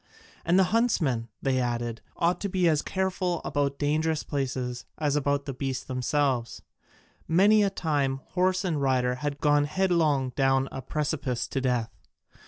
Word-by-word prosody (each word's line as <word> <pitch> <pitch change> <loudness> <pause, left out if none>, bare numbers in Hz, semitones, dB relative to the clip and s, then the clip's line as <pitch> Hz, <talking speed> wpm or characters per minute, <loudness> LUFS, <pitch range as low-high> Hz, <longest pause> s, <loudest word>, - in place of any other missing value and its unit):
And 175 +2 +3
the 190 - +6
huntsman, 155 - +1 0.2
they 130 -1 +1
added, 120 -2 -2 0.2
ought 175 +1 +1
to 200 - -2
be 180 -2 +2
as 155 -2 +3
careful 185 -2 -1
about 140 -1 -1
dangerous 155 +2 0
places 130 -3 -3
as 150 -2 0
about 140 -1 0
the 140 - -4
beasts 130 -1 -3
themselves: 130 -1 -1 0.6
many 200 +6 +5
a 200 - +3
time 145 -7 -1
horse 185 +1 +1
and 160 -5 -1
rider 130 -2 +2
had 145 -1 -2
gone 145 0 +3
headlong 155 -6 +1
down 135 0 +2
a 135 - -5
precipice 140 -5 -2
to 135 - -2
death. 125 -3 0
145 Hz, 155 wpm, -27 LUFS, 130-170 Hz, 0.6 s, the